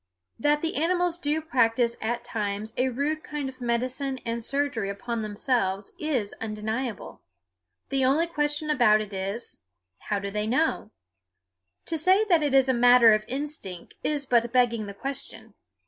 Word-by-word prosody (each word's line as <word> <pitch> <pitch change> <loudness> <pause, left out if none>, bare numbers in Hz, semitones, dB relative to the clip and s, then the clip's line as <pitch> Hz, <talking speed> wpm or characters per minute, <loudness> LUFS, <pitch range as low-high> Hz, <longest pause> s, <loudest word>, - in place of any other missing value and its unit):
That 295 +5 +2
the 325 - -1
animals 350 +2 +1
do 305 -1 0
practice 235 -5 +2
at 235 +2 -2
times 210 -1 -3
a 255 +1 +1
rude 290 +5 -1
kind 295 -2 -4
of 260 -1 -10
medicine 255 +3 -1
and 230 0 -3
surgery 275 -6 -1
upon 225 +4 -4
themselves 205 -2 -1
is 260 -10 -1
undeniable. 220 +1 -4 0.7
The 270 -1 +1
only 280 +6 +3
question 300 -2 0
about 240 -7 +5
it 210 -1 -7
is, 195 +5 -4 0.4
How 205 - -2
do 200 0 -4
they 210 +1 -2
know? 255 -2 0 1.0
To 325 - -2
say 370 +5 +5
it 310 -7 +3
is 270 -1 +5
a 260 - +3
matter 245 -2 +7
of 215 0 +1
instinct 265 - -5
is 290 -2 -1
but 235 -2 +2
begging 235 -4 +2
the 200 - -8
question. 225 -3 -6
245 Hz, 155 wpm, -26 LUFS, 220-290 Hz, 1.0 s, matter